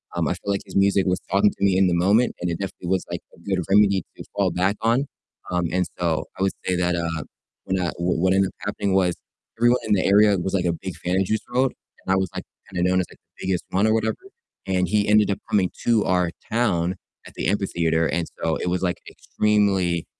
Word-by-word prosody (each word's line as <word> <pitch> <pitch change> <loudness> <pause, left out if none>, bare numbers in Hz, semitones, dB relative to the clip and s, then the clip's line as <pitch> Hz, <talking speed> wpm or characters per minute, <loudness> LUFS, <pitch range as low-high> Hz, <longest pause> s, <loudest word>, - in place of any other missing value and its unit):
um, - - 0
I - - +1
feel 100 - -4
like 100 - -1
his - - -12
music 100 0 +3
was 90 -1 +1
talking 100 +2 +4
to - - -7
me 95 -2 +3
in 95 0 +4
the 90 - +1
moment 100 +8 +3
and 90 - -1
it 85 - -2
definitely 95 -2 -6
was 95 -1 0
like - - -3 0.2
a - - -21
good 95 +1 -1
remedy 100 -2 +4
to - - -8
fall 100 -3 +1
back 95 +4 +1
on, 120 +5 +2 0.5
um, 90 -1 0
and 90 +1 +1
so 85 -3 0
I - - -3
would 95 - +2
say 90 - +1
that, 90 0 +1
uh 85 -2 -2 0.4
when, 95 0 0
uh 90 -1 0
w 85 -1 0
what 95 +1 +3
ended 95 0 +3
up - - -18
happening 100 -1 -1
was 90 -2 +2 0.4
everyone 120 +1 +4
in 105 - +3
the 95 - +2
area 100 0 +5
was 95 +2 -3
like 90 -2 +1
a 85 - +2
big 90 +1 -6
fan 90 +2 -2
of 95 - +2
Juice 110 +2 0
WRLD 130 +1 +2 0.3
and 95 - +2
I - - +4
was 95 -1 0
like - - -4 0.3
kind - - -4
of 90 - +2
known 95 0 +3
as - - -3
like - - -15 0.2
the - - -6
biggest 90 -2 0
one 100 +3 +2
or 110 - +3
whatever, 110 0 0 0.5
and 90 -1 +1
he 105 +3 +1
ended 105 -1 +4
up 95 - -2
coming 95 -3 +2 0.2
to 115 -3 +3
our 90 -2 +1 0.2
town 95 -6 +1 0.3
at - - -14
the - - -2
amphitheater, 85 -5 +1
and 85 +2 -1 0.2
so 80 -1 0
it - - -2
was 90 +1 -1
like 90 -2 -1
extremely, 95 -5 +1
95 Hz, 250 wpm, -23 LUFS, 90-100 Hz, 0.5 s, area